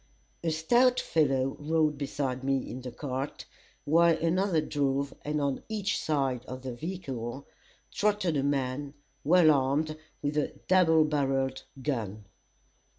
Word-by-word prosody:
A 165 - +1
stout 240 +11 +3
fellow 135 -4 +1
rode 155 0 +1
beside 135 -2 -3
me 135 0 0
in 130 - -6
the 125 - -6
cart, 130 +2 -5 0.4
while 165 +2 +4
another 170 +1 +1
drove, 140 -2 -1
and 150 +1 -2
on 140 -2 -1
each 210 -2 -1
side 135 -5 0
of 130 0 -7
the 130 -2 -4
vehicle 135 -4 -5 0.5
trotted 205 -5 +1
a 140 - +2
man, 140 0 -1 0.3
well 165 0 +6
armed 145 +3 +1 0.3
with 145 +1 -1
a 150 - 0
double 160 -4 +5
barrelled 135 -3 0 0.2
gun. 110 -7 -3
145 Hz, 135 wpm, -29 LUFS, 135-160 Hz, 0.5 s, well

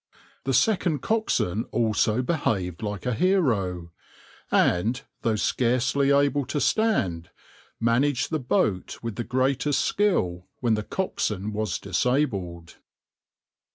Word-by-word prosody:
The 135 - 0
second 175 - +2
coxswain 125 - 0
also 110 +1 +1
behaved 95 - -1
like 105 -2 -4
a 125 - 0
hero, 110 - +1 0.6
and, 110 +9 +2 0.2
though 115 -2 +1
scarcely 130 +5 +1
able 140 0 +3
to 150 - -2
stand, 110 - +1 0.5
managed 125 +4 +1
the 155 - 0
boat 105 -7 0
with 115 -3 -4
the 120 - -3
greatest 130 +3 +1
skill 90 - 0
when 120 -3 +1
the 105 - 0
coxswain 105 - -2
was 105 -3 -1
disabled. 100 - -1
120 Hz, 115 wpm, -25 LUFS, 100-140 Hz, 0.6 s, able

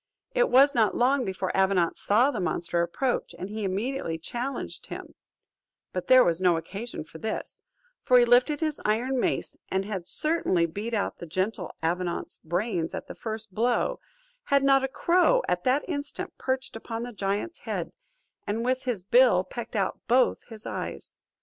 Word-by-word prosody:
It - - +3
was 275 +3 +6
not 225 -5 +2
long 255 +1 +3
before 190 -1 -3
Avenant 190 -3 +2
saw 240 +7 +3
the 225 - -3
monster 170 -1 0
approach, 240 +9 -1
and 185 - -6
he 215 +1 -4
immediately 195 -2 -2
challenged 240 +11 -5
him; - - -8 0.8
but 180 - -3
there 255 -1 +8
was 170 +1 +1
no 180 -3 +4
occasion 200 +6 -6
for 160 +1 -12
this, 220 +4 -5 0.4
for 250 - +5
he 240 - +6
lifted 250 +6 +4
his 310 -2 -1
iron 245 +5 +1
mace, - - -1
and 190 +1 0
had 190 -4 -5
certainly 305 - +1
beat 205 +8 -4
out 205 - -2
the 170 - -7
gentle 185 +2 -2
Avenant's 175 +1 -2
brains 175 0 -2
at - - -5
the - - -8
first 220 -3 -6
blow, 235 +4 +1 0.5
had 280 -1 +3
not 275 -1 +5
a - - +2
crow 360 - +3
at - - -1
that 260 +3 +2
instant 290 -4 -4
perched 260 -2 -2
upon 225 +1 -5
the 245 0 -6
giant's 205 - -2
head, - - -4 0.6
and 225 +3 -1
with 255 +1 0
his 230 -8 -2
bill 235 -3 +5
pecked 235 +3 -7
out 195 -3 0
both 250 +1 +3
his 220 -2 -11
eyes. - - -6
225 Hz, 175 wpm, -27 LUFS, 185-260 Hz, 0.8 s, there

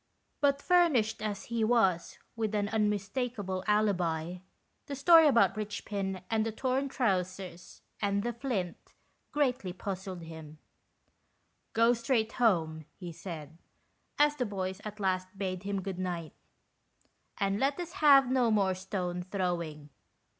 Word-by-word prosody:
But, 280 -1 +2
fur 355 -1 +5
nished 220 -7 0
as 205 -2 -3
he 235 -1 -2
was 205 -7 +2 0.2
with 220 -2 -1
an 205 -1 0
unmistakeable 210 -1 -1
alibi, 180 -5 +1 0.5
the 280 - -4
story 325 +3 +7
about 200 -9 +4
Richpin 200 -3 -4
and 220 -1 +1
the 225 - -2
torn 260 +4 -1
trousers, 185 -6 -2 0.2
and 200 -1 +1
the 240 +1 -2
flint, 225 -8 -4 0.4
greatly 255 -10 0
puzzled 190 -1 -5
hiin. 160 -2 -10 0.6
" - - -45
Go 230 +2 +5
straight 230 -1 0
home," 160 -9 +1
he 175 -3 -7
said, 160 -2 -8 0.6
as 295 0 +4
the 250 - 0
boys 190 -1 -4
at 210 0 -7
last 185 0 -1
bade 185 -2 -3
him 200 -1 -3
good 190 -1 -4
night, 175 -3 -3 0.5
" - - -42
and 200 0 +1
let 275 +4 +1
us 345 -1 -4
have 275 -3 +7
no 255 -3 +3
more 200 -3 +3
stone 185 -1 -3
throwing." 170 -6 -3
200 Hz, 140 wpm, -30 LUFS, 185-235 Hz, 0.6 s, story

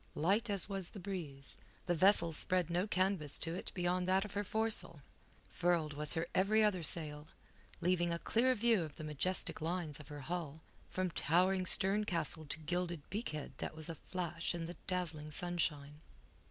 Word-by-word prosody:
Light 200 +9 +2
as 200 -2 +2
was 195 -3 +2
the 205 - -9
breeze, 165 -8 -6 0.3
the 175 - +1
vessel 175 0 +5
spread 180 +1 +2
no 180 +4 0
canvas 185 -7 +1
to 165 - -3
it 180 - -5
beyond 180 0 0
that 190 +2 +3
of 210 - -8
her 205 - -1
foresail. 215 -8 -1 0.5
Furled 170 -4 +1
was 150 +2 +1
her 160 - 0
every 215 +3 +3
other 200 -4 +2
sail, 150 -2 -1 0.5
leaving 175 -1 +2
a 170 - 0
clear 250 +8 +2
view 230 -3 +3
of 155 -3 -6
the - - -8
majestic 155 +5 -1
lines 160 -3 -1
of 150 - -11
her 145 0 -8
hull, 160 0 -5 0.3
from 185 -1 -2
towering 185 +5 +2
stern 195 +3 +5
castle 160 -3 0
to 145 - -2
gilded 170 -1 -3
beakhead 155 - -4
that - - -4
was 155 0 -2
aflash 170 0 -3
in 170 -1 -4
the 170 - -6
dazzling 165 -5 -2
sunshine. 150 -3 -1
175 Hz, 175 wpm, -35 LUFS, 155-190 Hz, 0.5 s, vessel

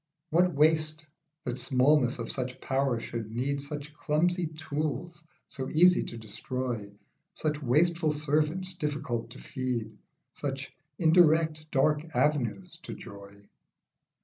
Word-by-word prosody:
What 175 +1 +3
waste, 155 +1 +3 0.4
that 125 +1 -3
smallness 130 +1 +3
of - - -4
such 125 -1 -3
power 135 -3 0
should 115 -2 -5
need 135 +5 -1
Such 145 +1 -6
clumsy 165 +4 +1
tools 155 +2 -4 0.2
so 130 -2 -5
easy 180 +3 +5
to 115 - -7
destroy, 115 -1 -4 0.4
Such 150 -2 -2
wasteful 155 +5 +2
servants 155 +5 0
difficult 145 -8 -3
to - - -11
feed, 125 -3 -3 0.4
Such 135 -1 -4 0.2
indirect 160 -2 +4
dark 150 +2 +2
avenues 150 - 0
to - - -7
joy. 100 0 -12
150 Hz, 120 wpm, -29 LUFS, 125-155 Hz, 0.4 s, easy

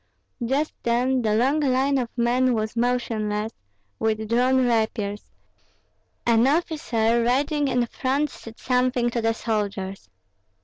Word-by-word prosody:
Just 275 +6 0
then 250 +2 +1
the 215 -2 +1
long 265 +7 +2
line 270 0 +2
of 240 -2 -2
men 245 +1 +2
was 215 0 -2
motionless, 225 -3 -1 0.5
with 220 0 -1
drawn 255 +3 +3
rapiers; 220 -3 -1 1.0
an 235 +1 +4
officer 245 -7 +1
riding 285 +4 +1
in 250 -2 +1
front 270 +4 -1
said 225 0 -12
something 250 -1 +1
to 235 - -1
the 225 0 +1
soldiers. 200 -4 -3
240 Hz, 125 wpm, -24 LUFS, 225-260 Hz, 1.0 s, an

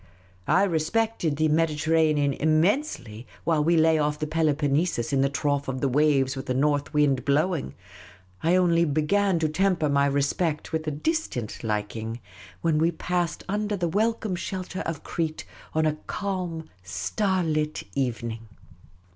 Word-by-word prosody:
I 195 - +4
respected 175 0 0
the 155 +2 +2
Mediterranean 155 -2 +2
innnensely 155 - 0 0.2
while 160 -3 +2
we 170 +2 +3
lay 160 0 +4
off 150 0 0
the 155 - -2
Peloponnesus 150 -3 0
in 135 - +3
the 140 - +3
trough 145 0 -1
of 130 -1 -3
the 140 - +1
waves 135 -1 +2
with 130 - -7
a 130 - +1
north 145 +1 +1
wind 140 -4 +2
blowing; 145 - 0 0.7
I 170 +3 +3
only 170 -2 +4
began 170 +5 +2
to 160 -1 +1
temper 165 -1 +1
my 140 0 +3
respect 145 +3 -1
with 160 0 -2
a - - +1
distant 145 - -2
liking 110 +1 -3 0.4
when 160 -2 +2
we 165 +2 +3
passed 175 +1 -2
under 210 +1 -1
the 175 -2 0
welcome 215 +1 0
shelter 185 +1 -5
of 165 -3 -4
Crete 160 -2 -3 0.3
on 160 0 +2
a 155 - +2
calm, 180 -5 -3
star 135 - -1
lit 155 -1 -1
evening. 115 -4 -3
155 Hz, 150 wpm, -26 LUFS, 140-175 Hz, 0.7 s, I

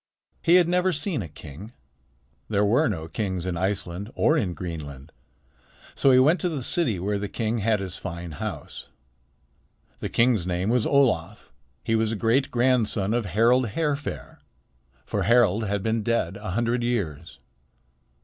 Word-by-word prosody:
He 170 - +4
had 180 -2 +5
never 180 +1 +2
seen 150 - 0
a 85 - -6
king. 80 - -11 0.8
There 105 -1 +2
were 115 +6 +3
no 80 -6 -4
kings 95 -1 -3
in 90 -2 -2
Iceland 95 +1 -3
or 155 - +3
in 95 - -1
Greenland. 75 -5 -7 0.8
So 140 - +2
he 130 - +6
went 150 +8 +4
to 180 - +1
the 145 -6 -4
city 130 - +1
where 100 +3 -1
the 100 0 -4
king 115 +1 -2
had 110 0 +1
his 95 -1 -5
fine 85 0 -6
house. 75 - -7 1.1
The - - -4
king's 115 -7 +2
name 90 +4 -1
was 125 -3 +2
Olaf. 110 - +1 0.3
He 115 - -1
was 110 -1 +1
a - - -1
great 120 +5 +1
grandson 120 -5 +1
of 120 -2 0
Harald 120 +6 +3
Hairfair; 150 -3 -3 0.7
for - - -2
Harald 115 -2 +3
had 100 -1 -2
been 110 0 0
dead 115 -3 -1
a 105 +1 -7
hundred 120 +5 0
years. 85 -11 -3
110 Hz, 160 wpm, -25 LUFS, 95-125 Hz, 1.1 s, he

